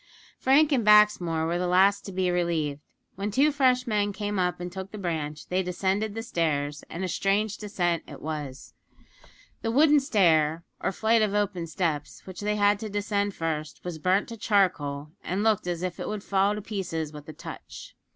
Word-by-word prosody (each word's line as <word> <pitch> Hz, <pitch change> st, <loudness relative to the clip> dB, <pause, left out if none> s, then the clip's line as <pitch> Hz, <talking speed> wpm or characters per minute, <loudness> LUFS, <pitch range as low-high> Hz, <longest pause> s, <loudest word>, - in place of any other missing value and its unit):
Frank 290 Hz, +4 st, +4 dB
and 255 Hz, -5 st, +2 dB
Baxmore 210 Hz, -6 st, +4 dB
were 170 Hz, +2 st, -1 dB
the 180 Hz, -, 0 dB
last 195 Hz, +3 st, +4 dB
to 195 Hz, -, -6 dB
be 185 Hz, -1 st, 0 dB
relieved. 165 Hz, -5 st, 0 dB, 0.4 s
When 200 Hz, +2 st, -2 dB
two 275 Hz, +8 st, +3 dB
fresh 255 Hz, -3 st, +2 dB
men 210 Hz, -3 st, 0 dB
came 205 Hz, -1 st, -3 dB
up 180 Hz, -1 st, 0 dB
and 175 Hz, 0 st, -5 dB
took 190 Hz, +1 st, -6 dB
the 215 Hz, -, -8 dB
branch 155 Hz, -5 st, -3 dB
they 185 Hz, +1 st, +1 dB
descended 195 Hz, +3 st, -1 dB
the 225 Hz, -, -4 dB
stairs, 150 Hz, -7 st, -1 dB
and 175 Hz, -, -5 dB
a -, -, 0 dB
strange 200 Hz, +4 st, 0 dB
descent 175 Hz, -5 st, -1 dB
it 145 Hz, -, -10 dB
was. 145 Hz, -3 st, -6 dB, 0.9 s
The 225 Hz, -, -2 dB
wooden 295 Hz, +5 st, +5 dB
stair, 170 Hz, -, +2 dB, 0.2 s
or -, -, -1 dB
flight 220 Hz, +4 st, +2 dB
of 210 Hz, -1 st, +1 dB
open 195 Hz, -5 st, -1 dB
steps, 160 Hz, -3 st, -3 dB
which 185 Hz, -2 st, -9 dB
they 210 Hz, +1 st, 0 dB
had 205 Hz, 0 st, +3 dB
to 220 Hz, -, -5 dB
descend 205 Hz, 0 st, -1 dB
first, 155 Hz, -2 st, -3 dB
was 175 Hz, -3 st, -5 dB
burnt 185 Hz, +5 st, +2 dB
to 230 Hz, -, -7 dB
charcoal, 155 Hz, -9 st, 0 dB
and 190 Hz, +4 st, -2 dB
looked 220 Hz, -5 st, +2 dB
as 175 Hz, 0 st, -2 dB
if 180 Hz, -1 st, -4 dB
it -, -, -4 dB
would 210 Hz, -2 st, -4 dB
fall 200 Hz, +1 st, +2 dB
to 210 Hz, -, -6 dB
pieces 170 Hz, -7 st, -4 dB
with 150 Hz, 0 st, -10 dB
a -, -, -7 dB
touch. -, -, -10 dB
190 Hz, 195 wpm, -27 LUFS, 165-210 Hz, 0.9 s, wooden